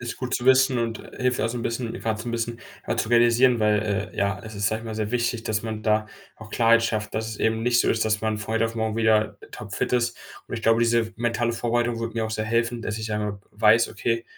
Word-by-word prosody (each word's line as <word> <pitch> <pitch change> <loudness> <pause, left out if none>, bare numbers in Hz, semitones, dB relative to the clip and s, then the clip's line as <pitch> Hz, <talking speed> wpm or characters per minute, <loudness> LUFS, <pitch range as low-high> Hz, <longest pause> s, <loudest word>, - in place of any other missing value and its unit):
Ist 120 -1 -5
gut 125 0 -3
zu 120 - -2
wissen 130 0 +5
und 115 -1 -3
hilft 125 -1 +1
auch 110 - +1
so 120 - -4
'n 115 - -4
bisschen 115 0 -3
grad 110 -1 -1
so 120 - -6
'n - - -3
bisschen 115 0 -3 0.4
zu - - -1
realisieren, 120 0 +4
weil, 105 -1 +1
äh, - - -14
ja, 100 -1 0
es 110 -1 -9
ist, 100 0 0
sage 110 +2 0
ich 115 - -11
mal, 110 - -5
sehr 110 +1 -3
wichtig, 120 -1 -1
dass 110 0 -1
man 110 -1 -5
da 110 0 +2 0.3
auch 110 -1 -12
Klarheit 115 0 +4
schafft, 110 -2 -2
dass 110 0 -2
es 110 - -6
eben 110 0 0
nicht 120 0 +3
so - - +1
ist, 115 - +2
dass 110 -1 +1
man 110 -1 -1
von 110 +1 -4
heute 115 0 +2
auf 115 0 -3
morgen 110 -1 -2
wieder 110 -1 +2
topfit - - -4
ist. 120 -1 +1 0.3
Und - - -4
ich 115 - -5
glaube, 115 +1 +3
diese 115 -1 +2
mentale 120 0 0
Vorbereitung 120 0 -1
würde 115 -1 -3
mir 115 -1 -1
auch - - -7
sehr 110 - -2
helfen, 115 +1 0
dass 110 +1 -3
ich 110 0 -4
einmal 105 -1 -2
weiß: 110 +2 +4
„Okay, 115 0 -2
115 Hz, 265 wpm, -24 LUFS, 110-120 Hz, 0.4 s, wissen